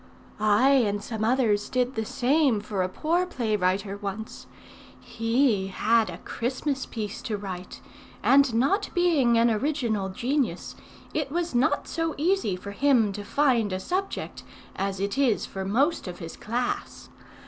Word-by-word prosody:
"I 215 Hz, +5 st, +4 dB
and 210 Hz, -7 st, +2 dB
some 220 Hz, -1 st, -4 dB
others 220 Hz, -4 st, +2 dB
did 255 Hz, 0 st, 0 dB
the 225 Hz, -2 st, -2 dB
same 270 Hz, -1 st, +2 dB
for 205 Hz, -2 st, -3 dB
a 185 Hz, -, 0 dB
poor 340 Hz, -, 0 dB
play 235 Hz, -11 st, -1 dB
writer 195 Hz, +1 st, 0 dB
once. 205 Hz, +2 st, -6 dB, 0.5 s
He 225 Hz, -3 st, +1 dB
had 220 Hz, +2 st, +2 dB
a 170 Hz, -, -6 dB
Christmas 265 Hz, +7 st, -3 dB
piece 215 Hz, -2 st, -5 dB
to 215 Hz, -4 st, -3 dB
write, 185 Hz, -3 st, -7 dB, 0.4 s
and 275 Hz, -1 st, +5 dB
[not] 380 Hz, -, +2 dB
being 305 Hz, -10 st, +3 dB
an 230 Hz, 0 st, +4 dB
original 225 Hz, -5 st, -1 dB
genius, 245 Hz, -, -1 dB, 0.4 s
it 300 Hz, -3 st, -2 dB
was 340 Hz, 0 st, -2 dB
not 255 Hz, +6 st, +1 dB
so 330 Hz, -1 st, -2 dB
easy 340 Hz, -, +1 dB
for 200 Hz, +2 st, -8 dB
him 235 Hz, -2 st, +3 dB
to 205 Hz, +1 st, -6 dB
find 240 Hz, -3 st, +2 dB
a 185 Hz, -, -2 dB
subject 370 Hz, -, -3 dB, 0.3 s
as 195 Hz, 0 st, -2 dB
it 200 Hz, +6 st, -2 dB
is 255 Hz, -6 st, +2 dB
for 195 Hz, -, -6 dB
most 265 Hz, -, +1 dB
of 180 Hz, -1 st, -6 dB
his 165 Hz, -1 st, -8 dB
class. 240 Hz, +3 st, -3 dB
230 Hz, 155 wpm, -26 LUFS, 205-275 Hz, 0.5 s, and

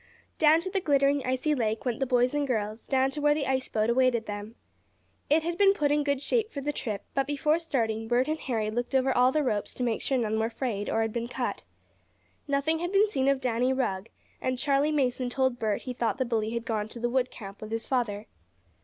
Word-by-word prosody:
Down 315 Hz, +1 st, +5 dB
to 375 Hz, -, -4 dB
the 390 Hz, -, 0 dB
glittering, 280 Hz, -3 st, +2 dB
icy 260 Hz, +4 st, +1 dB
lake 220 Hz, -6 st, -1 dB
went 240 Hz, -3 st, -1 dB
the 270 Hz, -, 0 dB
boys 250 Hz, +1 st, +2 dB
and 290 Hz, -1 st, 0 dB
girls, 215 Hz, -2 st, -2 dB
down 265 Hz, 0 st, +2 dB
to 295 Hz, -, -4 dB
where 295 Hz, 0 st, +4 dB
the 295 Hz, -2 st, -1 dB
ice 265 Hz, -1 st, -1 dB
boat 215 Hz, 0 st, 0 dB
awaited 240 Hz, -1 st, +2 dB
them. 205 Hz, +2 st, -6 dB, 0.7 s
It 310 Hz, +2 st, +4 dB
had 340 Hz, +2 st, -3 dB
been 395 Hz, -1 st, +6 dB
put 290 Hz, -4 st, +1 dB
in 295 Hz, 0 st, +2 dB
good 280 Hz, -1 st, -1 dB
shape 445 Hz, +5 st, +1 dB
for 285 Hz, -, -6 dB
the 295 Hz, +2 st, -2 dB
trip, 215 Hz, -7 st, -4 dB
but 275 Hz, -1 st, 0 dB
before 300 Hz, +3 st, +1 dB
starting 225 Hz, -9 st, -1 dB
Bert 245 Hz, +2 st, +2 dB
and 310 Hz, +1 st, -1 dB
Harry 220 Hz, -6 st, -2 dB
looked 245 Hz, +4 st, -2 dB
over 265 Hz, 0 st, +2 dB
all 250 Hz, +1 st, +5 dB
the 305 Hz, +2 st, +1 dB
ropes 210 Hz, -6 st, -1 dB
to 250 Hz, -, -3 dB
make 235 Hz, -2 st, 0 dB
sure 270 Hz, -, 0 dB
none 220 Hz, -2 st, 0 dB
were 225 Hz, +1 st, 0 dB
frayed, 225 Hz, -5 st, -3 dB
or 225 Hz, -, +1 dB
had 225 Hz, -1 st, -3 dB
been 235 Hz, 0 st, -2 dB
cut. 250 Hz, -, -3 dB, 0.9 s
Nothing 285 Hz, +3 st, +1 dB
had 350 Hz, +1 st, -3 dB
been 400 Hz, +2 st, +4 dB
seen 270 Hz, -10 st, -1 dB
of 275 Hz, -1 st, +2 dB
Danny 250 Hz, 0 st, +1 dB
Rugg, 200 Hz, -6 st, -2 dB, 0.3 s
and 255 Hz, 0 st, -1 dB
Charley 285 Hz, +2 st, +2 dB
Mason 255 Hz, -4 st, 0 dB
told 260 Hz, -1 st, 0 dB
Bert 215 Hz, -2 st, -1 dB
he 255 Hz, -, -4 dB
thought 235 Hz, 0 st, -1 dB
the 260 Hz, -, 0 dB
bully 225 Hz, -2 st, -1 dB
had 235 Hz, 0 st, -3 dB
gone 215 Hz, -2 st, -1 dB
to 235 Hz, -, -9 dB
the 240 Hz, -, 0 dB
wood 250 Hz, +1 st, +1 dB
camp 200 Hz, -2 st, -10 dB
with 215 Hz, -, -7 dB
his 225 Hz, 0 st, -1 dB
father. 220 Hz, -5 st, -1 dB
255 Hz, 240 wpm, -28 LUFS, 225-285 Hz, 0.9 s, been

